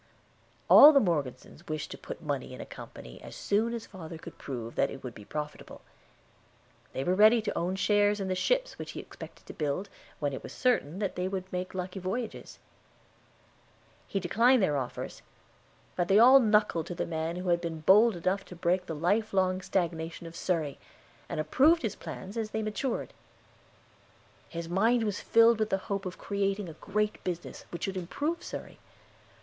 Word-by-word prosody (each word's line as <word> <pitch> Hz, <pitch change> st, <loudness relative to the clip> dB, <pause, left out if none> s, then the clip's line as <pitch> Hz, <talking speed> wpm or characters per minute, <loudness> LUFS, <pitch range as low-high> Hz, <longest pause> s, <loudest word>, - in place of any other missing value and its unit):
All 295 Hz, -, +11 dB
the 280 Hz, -, +6 dB
Morgesons 150 Hz, -, -2 dB
wished 155 Hz, -1 st, -4 dB
to -, -, -5 dB
put -, -, -8 dB
money 140 Hz, -4 st, -3 dB
in -, -, -12 dB
a -, -, -6 dB
company, -, -, -11 dB
as -, -, -10 dB
soon 220 Hz, +3 st, +1 dB
as 235 Hz, -1 st, -5 dB
father 165 Hz, -4 st, -9 dB
could -, -, -11 dB
prove 120 Hz, -4 st, -6 dB
that -, -, +1 dB
it 135 Hz, -, -9 dB
would 125 Hz, -2 st, -6 dB
be 105 Hz, -, -12 dB
profitable. 150 Hz, +3 st, -6 dB, 1.1 s
They 135 Hz, -, -2 dB
were 180 Hz, -, +1 dB
ready 215 Hz, +4 st, +6 dB
to 215 Hz, -1 st, -3 dB
own 180 Hz, +2 st, -1 dB
shares 205 Hz, +1 st, +3 dB
in 195 Hz, -, -2 dB
the 185 Hz, -, 0 dB
ships -, -, 0 dB
which -, -, -6 dB
he -, -, -6 dB
expected -, -, -11 dB
to -, -, -9 dB
build, 155 Hz, +6 st, -2 dB, 0.3 s
when 145 Hz, -2 st, -2 dB
it -, -, -5 dB
was -, -, -9 dB
certain 210 Hz, -, +1 dB
that 200 Hz, -2 st, -2 dB
they 180 Hz, +1 st, -1 dB
would 190 Hz, -1 st, -5 dB
make 180 Hz, +1 st, -3 dB
lucky 185 Hz, +1 st, -4 dB
voyages. 215 Hz, +6 st, -4 dB, 1.5 s
He 195 Hz, -, -1 dB
declined 230 Hz, +6 st, +4 dB
their 150 Hz, -5 st, +2 dB
offers, 130 Hz, -3 st, -4 dB, 0.7 s
but 175 Hz, -1 st, 0 dB
they 195 Hz, -, +5 dB
all 255 Hz, +5 st, +9 dB
"knuckled" 210 Hz, -, +2 dB
to 175 Hz, -, -5 dB
the -, -, -2 dB
man 160 Hz, +1 st, -3 dB
who 180 Hz, 0 st, -3 dB
had 170 Hz, 0 st, +3 dB
been 165 Hz, -2 st, -4 dB
bold 210 Hz, +6 st, +6 dB
enough 185 Hz, +3 st, -1 dB
to 180 Hz, -, -11 dB
break 180 Hz, +2 st, 0 dB
the 160 Hz, -, -4 dB
life 200 Hz, +8 st, +1 dB
long 185 Hz, 0 st, +2 dB
stagnation 170 Hz, -3 st, -2 dB
of 165 Hz, 0 st, -9 dB
Surrey, 160 Hz, -6 st, -1 dB, 0.5 s
and -, -, -3 dB
approved 300 Hz, -, +4 dB
his 220 Hz, -, -1 dB
plans 195 Hz, +4 st, -8 dB
as 220 Hz, -1 st, -2 dB
they 220 Hz, 0 st, -2 dB
matured. 215 Hz, +4 st, -3 dB, 1.4 s
His 170 Hz, 0 st, -5 dB
mind 225 Hz, +7 st, +2 dB
was 210 Hz, -3 st, -2 dB
filled 230 Hz, 0 st, +5 dB
with 215 Hz, -1 st, +1 dB
the 195 Hz, -, +2 dB
hope 195 Hz, -1 st, -1 dB
of 180 Hz, -, -7 dB
creating 200 Hz, -1 st, -1 dB
a 165 Hz, -, -8 dB
great 210 Hz, +1 st, -1 dB
business 175 Hz, -1 st, -5 dB
which 170 Hz, -, -7 dB
should 195 Hz, -1 st, -2 dB
improve 295 Hz, -, -2 dB
Surrey. -, -, -8 dB
185 Hz, 190 wpm, -29 LUFS, 165-215 Hz, 1.5 s, All